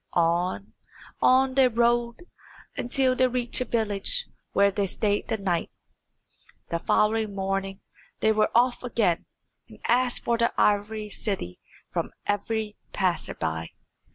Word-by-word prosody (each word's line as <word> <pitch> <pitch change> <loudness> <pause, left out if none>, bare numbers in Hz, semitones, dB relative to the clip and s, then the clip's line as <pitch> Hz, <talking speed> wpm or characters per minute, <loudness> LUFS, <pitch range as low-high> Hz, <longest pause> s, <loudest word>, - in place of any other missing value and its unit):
On, 175 +3 0 0.5
on 260 +1 +4
they 265 -1 +5
rode, 235 +2 +1 0.5
until 255 +1 +1
they 255 0 +4
reached 250 0 -1
a - - 0
village 225 - 0 0.3
where 200 0 +4
they 200 0 -1
stayed 205 +2 -1
the 225 - -1
night. 180 -4 -1 1.0
The 170 - -1
following 215 +2 +1
morning 195 0 -2 0.4
they 220 - +3
were 215 0 +2
off 245 +1 +3
again, 220 -8 0 0.4
and - - -13
asked 245 +1 +2
for 235 -1 +1 0.2
Ivory 210 +1 +1
City 190 - -3 0.3
from - - -2 0.2
every 210 +1 -2 0.2
passer 185 -3 0
by. 80 +1 -3
215 Hz, 125 wpm, -26 LUFS, 195-240 Hz, 1.0 s, they